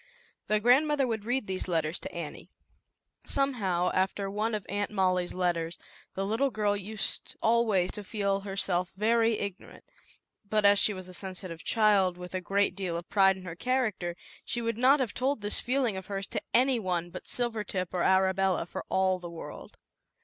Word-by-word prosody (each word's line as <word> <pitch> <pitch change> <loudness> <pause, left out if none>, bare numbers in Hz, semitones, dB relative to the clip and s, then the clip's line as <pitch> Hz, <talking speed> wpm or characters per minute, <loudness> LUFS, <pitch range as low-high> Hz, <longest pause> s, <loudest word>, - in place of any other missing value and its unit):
The 215 0 +2
grandmother 275 +5 +4
would 220 -4 -3
read 245 0 0
these 190 -1 -2
letters 165 -1 0
to 285 - -7
Annie. - - -7 0.7
Somehow, 200 -11 0
after 195 +1 0
one 215 +2 -1
of 210 - -5
Aunt 205 +1 -2
Molly's 185 -3 0
letters, 175 -2 -1 0.4
the 195 - -1
little 225 +7 +1
girl 210 -3 0
used 205 +1 -1
always 220 -5 +2
to 210 - -6
feel 200 -1 -1
herself 195 -2 -1
very 225 +1 +3
ignorant, 200 -1 -7 0.6
but 210 +1 0
as 200 0 +7
she - - +5
was 185 -2 -7
a 185 - -11
sensitive 185 -3 -4
child 200 -5 +3
with 180 0 -9
a 185 - -2
great 200 +3 +1
deal 185 -4 -3
of 170 - -8
pride 195 -2 +4
in 185 - -11
her 170 -3 -7
character, 215 -6 -1 0.3
she 240 - -2
would 230 -1 -2
not 270 +4 +5
have 250 -5 -1
told 265 -2 0
this 205 0 +3
feeling 250 -4 0
of 190 0 -7
hers 195 -1 -3
to - - -3
any 255 0 +3
one 175 -4 -2
but - - -9
Silvertip 210 -7 -2
or 180 - 0
Arabella 190 -1 +2
for - - -6 0.4
the 175 - -7
world. 170 -1 -10
200 Hz, 180 wpm, -29 LUFS, 185-225 Hz, 0.7 s, as